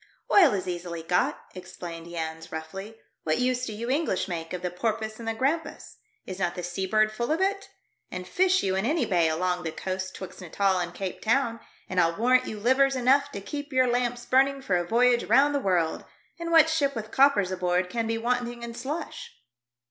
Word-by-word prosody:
"Oil 330 - +7
is 185 -1 -3
easily 175 -2 -5
got," 175 +2 +1
exclaimed 170 -2 -8
Jans, 160 -1 -5
roughly. 190 +7 -7 0.3
"What 155 -1 0
use 250 0 0
do 220 - -5
you 230 +3 -5
English 275 - 0
make 165 -3 -5
of 180 -1 -5
the 180 - -2
porpoise 220 +3 -3
and 230 - -7
the 225 - -1
grampus? 290 +7 -2 0.3
Is 185 0 -7
not 175 -2 -1
the 180 - -5
sea 175 +2 -3
bird 215 +2 +3
full 235 +5 -3
of 320 - +1
it? 395 +1 -1 0.4
And 180 0 -6
fish 375 - +2
you 190 -1 0
in 190 - 0
any 295 +2 +1
bay 175 -6 +2
along 180 +2 0
the 165 -2 -3
coast 185 +2 -4
'twixt 190 - -9
Natal 190 +2 +1
and 175 -1 -3
Cape 185 +1 -5
Town, 230 0 +1 0.3
and 185 -1 +1
I'll 165 0 +1
warrant 255 +3 +3
you 215 - -5
livers 265 +4 +3
enough 270 +3 +3
to 200 - -5
keep 290 +7 -6
your 255 -1 +3
lamps 245 0 -1
burning 270 +1 +2
for 195 -8 +1
a 175 -1 0
voyage 240 +2 +3
round 285 +2 +4
the 285 - +1
world. 180 -8 0 0.4
And 335 0 -4
what 325 -2 +6
ship 290 -4 +1
with 220 -1 -5
coppers 265 -9 +4
aboard 180 0 0
can 230 -1 -1
be 225 0 -1
wanting 240 0 -2
in 235 0 -6
slush 280 +7 -5
220 Hz, 210 wpm, -27 LUFS, 180-260 Hz, 0.4 s, Oil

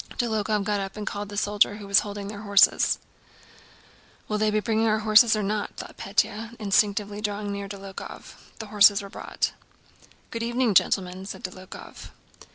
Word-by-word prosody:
Dólokhov 215 -3 0
got 205 0 -1
up 195 +1 -5
and 210 - -5
called 205 -1 -5
to - - -9
the - - -6
soldier 205 0 +2
who 205 -1 -9
was 200 -1 +5
holding 205 -1 -6
their 205 0 -7
horses. 200 -2 +4 1.3
"Will 210 0 -1
they 215 0 +2
bring 220 0 0
our 215 0 +3
horses 220 +1 +6
or 215 - -1
not?" 205 +1 -3
thought - - -8
Pétya, 215 +3 -1
instinctively 205 0 +1
drawing 205 -1 -3
nearer 200 0 -5
to 200 - -6
Dólokhov. 195 -1 -9 0.2
The 220 - -7
horses 205 0 +6
were 200 - -10
brought. - - -3 0.8
"Good 230 - -4
evening, 235 -1 +1
gentlemen," 185 0 +1
said - - -8
Dólokhov. 185 0 -9
205 Hz, 170 wpm, -25 LUFS, 200-215 Hz, 1.3 s, horses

